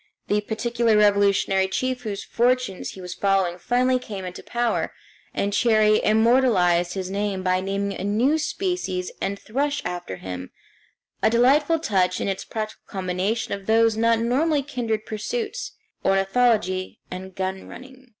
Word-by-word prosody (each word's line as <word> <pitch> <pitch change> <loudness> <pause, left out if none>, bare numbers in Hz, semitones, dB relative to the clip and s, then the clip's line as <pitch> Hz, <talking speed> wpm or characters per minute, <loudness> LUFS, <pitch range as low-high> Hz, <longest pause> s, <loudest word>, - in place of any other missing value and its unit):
The 210 0 +2
particular 225 +1 +1
revolutionary 200 -2 +3
chief 255 +6 -2
whose 210 -4 -4
fortunes 245 -5 0
he 190 - -10
was 180 0 -6
following 190 -2 +1
finally 250 +4 +2
came 200 -6 -7
into 180 0 -7
power, 240 -1 -1 0.4
and 200 0 -1
Cherrie 215 -2 +4
immortalized 215 -7 +3
his 190 -1 -4
name 200 -1 -2
by 185 0 +1
naming 200 +1 -2
a 185 - -6
new 240 +10 +2
species 360 - -2
of - - -24
ant 200 +1 -1
thrush 285 +8 -1
after 175 - -4
him 90 -1 -7 0.7
a - - +4
delightful 280 +7 +4
touch, 190 - +1
in - - -2
its 195 -1 -2
practical 215 -1 -5
combination 190 +4 -2
of 200 -1 -6
those 225 0 +4
not 230 +1 +3
normally 280 +6 +1
kindred 235 -6 -3
pursuits, 435 - -4 0.3
ornithology 195 -1 +1
and 185 0 -7
gun 190 0 -3
running. 260 0 -12
215 Hz, 150 wpm, -24 LUFS, 190-245 Hz, 0.7 s, Cherrie